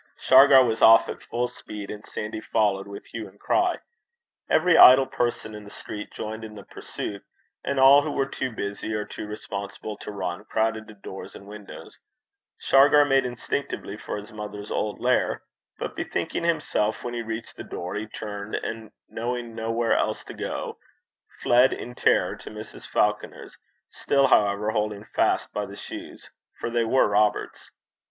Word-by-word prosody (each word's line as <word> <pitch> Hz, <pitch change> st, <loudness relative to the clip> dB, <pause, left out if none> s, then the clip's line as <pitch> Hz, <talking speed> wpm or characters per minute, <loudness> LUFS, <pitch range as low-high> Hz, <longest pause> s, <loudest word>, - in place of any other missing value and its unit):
Shargar 135 Hz, 0 st, +7 dB
was 115 Hz, -1 st, -1 dB
off 115 Hz, 0 st, +8 dB
at -, -, -6 dB
full 120 Hz, +1 st, -2 dB
speed, 105 Hz, -4 st, -8 dB
and 105 Hz, 0 st, -8 dB
Sandy 105 Hz, +1 st, -5 dB
followed 100 Hz, -4 st, 0 dB
with 100 Hz, 0 st, -9 dB
hue 115 Hz, -2 st, -7 dB
and 100 Hz, +2 st, -19 dB
cry. 360 Hz, 0 st, +2 dB, 0.7 s
Every 180 Hz, -2 st, +4 dB
idle 130 Hz, -2 st, +9 dB
person 120 Hz, -4 st, -2 dB
in 105 Hz, 0 st, -8 dB
the 100 Hz, -, -11 dB
street 105 Hz, 0 st, -7 dB
joined 110 Hz, +1 st, -6 dB
in 110 Hz, -1 st, -8 dB
the 100 Hz, -, -10 dB
pursuit, 100 Hz, +1 st, -7 dB, 0.4 s
and 140 Hz, -1 st, -1 dB
all 135 Hz, +2 st, +8 dB
who 155 Hz, -, -3 dB
were 135 Hz, -, 0 dB
too 130 Hz, -1 st, -4 dB
busy 100 Hz, 0 st, -4 dB
or 105 Hz, 0 st, -2 dB
too -, -, -7 dB
respectable 105 Hz, 0 st, -6 dB
to -, -, -9 dB
run 90 Hz, -1 st, -4 dB
crowded 110 Hz, 0 st, -1 dB
to 110 Hz, -, -12 dB
door 95 Hz, -1 st, -8 dB
and 100 Hz, -, -11 dB
windows. 105 Hz, 0 st, -11 dB, 0.6 s
Shargar 145 Hz, +2 st, +5 dB
made 135 Hz, -2 st, +3 dB
instinctively 125 Hz, -3 st, -4 dB
for 105 Hz, -, -5 dB
his 105 Hz, +1 st, -10 dB
mother's 105 Hz, -1 st, -7 dB
old 105 Hz, -1 st, -2 dB
lair; -, -, +1 dB, 0.3 s
but -, -, -5 dB
bethinking -, -, -3 dB
himself 150 Hz, -10 st, 0 dB
when 120 Hz, -, -4 dB
he 120 Hz, -, -2 dB
reached 115 Hz, 0 st, -6 dB
the -, -, -8 dB
door, 90 Hz, +1 st, -6 dB
he 110 Hz, +1 st, -4 dB
turned, 105 Hz, -1 st, -6 dB
and, 110 Hz, -1 st, -5 dB, 0.2 s
knowing 120 Hz, 0 st, -4 dB
nowhere 115 Hz, 0 st, 0 dB
else 110 Hz, -, -1 dB
to -, -, -9 dB
go, -, -, -5 dB, 0.6 s
fled 125 Hz, +2 st, +5 dB
in 125 Hz, -, -6 dB
terror -, -, +2 dB
to -, -, -10 dB
Mrs. -, -, -10 dB
Falconer's, -, -, -1 dB, 0.4 s
still, 140 Hz, -1 st, +2 dB
however, 105 Hz, -1 st, +3 dB
holding 105 Hz, -1 st, -2 dB
fast -, -, 0 dB
by -, -, -2 dB
the -, -, -10 dB
shoes, -, -, -9 dB, 0.3 s
for 115 Hz, -, -3 dB
they 120 Hz, 0 st, +2 dB
were 130 Hz, +4 st, +3 dB
Robert's. 105 Hz, +1 st, 0 dB
110 Hz, 170 wpm, -25 LUFS, 105-125 Hz, 0.7 s, idle